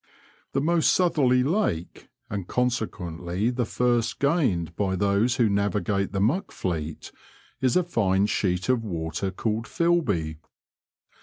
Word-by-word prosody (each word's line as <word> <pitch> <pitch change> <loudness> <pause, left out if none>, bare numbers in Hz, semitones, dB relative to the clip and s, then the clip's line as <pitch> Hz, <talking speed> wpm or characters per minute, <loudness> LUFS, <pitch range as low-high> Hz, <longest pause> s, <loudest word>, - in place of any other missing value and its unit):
The 135 - +1
most 165 +2 +3
southerly 140 -8 +3
lake, 140 - -1 0.2
and 100 -6 -5
ccmsequeutly 105 -4 -1
the 120 -2 0
first 120 -2 +1
gained 125 - +1
by 95 -1 0
those 100 +5 +2
who 120 -3 +3
navigate 100 0 0
the 95 - -2
Muck 150 - +1
Fleet, 80 -4 -4 0.5
is 130 -2 +2
a 180 - +3
fine 100 - +1
sheet 90 -3 0
of 125 -3 +2
water 85 -1 -3
called 110 +3 -2
Filby. 110 - 0
105 Hz, 130 wpm, -25 LUFS, 95-130 Hz, 0.5 s, most